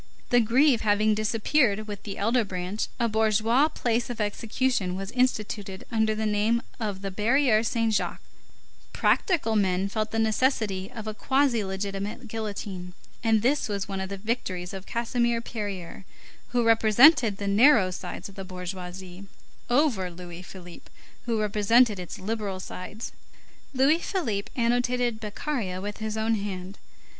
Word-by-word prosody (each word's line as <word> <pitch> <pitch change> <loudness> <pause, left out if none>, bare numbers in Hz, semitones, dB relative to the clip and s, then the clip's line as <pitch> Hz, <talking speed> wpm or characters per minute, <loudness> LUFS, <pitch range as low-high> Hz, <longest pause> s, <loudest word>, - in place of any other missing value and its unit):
The 245 0 +6
Grève 250 +3 +4
having 215 0 +3
disappeared 215 +1 +1
with 205 -2 -6
the 200 -2 -7
elder 230 +4 +2
branch, 185 +1 -3
a 235 - +2
bourgeois 220 +5 +3
place 240 -6 -1
of 240 -2 -5
execution 215 -1 -1
was 195 +2 -5
instituted 215 -6 -1
under 220 -1 +2
the 220 0 -2
name 215 +3 +1 0.2
of 205 -4 -3
the 195 - -3
Barrière 225 +2 +3
Saint 230 -1 0
Jacques; - - -1 0.7
"practical 290 - +2
men" 190 -2 +2
felt 215 +1 -2
the 225 - -3
necessity 220 -3 +1
of 225 -4 -7
a 215 - -3
quasi 265 -1 +1
legitimate 195 +4 -4
guillotine; 200 -5 -5 0.3
and 225 -2 +3
this 270 -1 +1
was 200 -2 -2
one 195 -1 -3
of 190 - -4
the 200 - -5
victories 190 -4 -3
of 195 0 -8
Casimir 235 0 0
Périer, 205 -6 -6 0.4
who 240 -1 +1
represented 225 +1 +6
the 200 - -5
narrow 210 -2 +5
sides 180 - -6
of 200 - -13
the 195 - -7
bourgeoisie, 180 0 -7 0.4
over 240 -8 +2
Louis 175 0 -9
Philippe, 180 -2 -12 0.4
who 230 -2 +1
represented 215 +1 +3
its 180 - -7
liberal 205 -1 -3
sides. 195 +4 -7 0.6
Louis 275 +4 +3
Philippe 235 - -2
annotated 245 -1 +1
Beccaria 210 -3 -3
with 205 +2 -5
his 220 0 -4
own 220 +1 +1
hand. 195 -2 -4
215 Hz, 150 wpm, -26 LUFS, 195-235 Hz, 0.7 s, The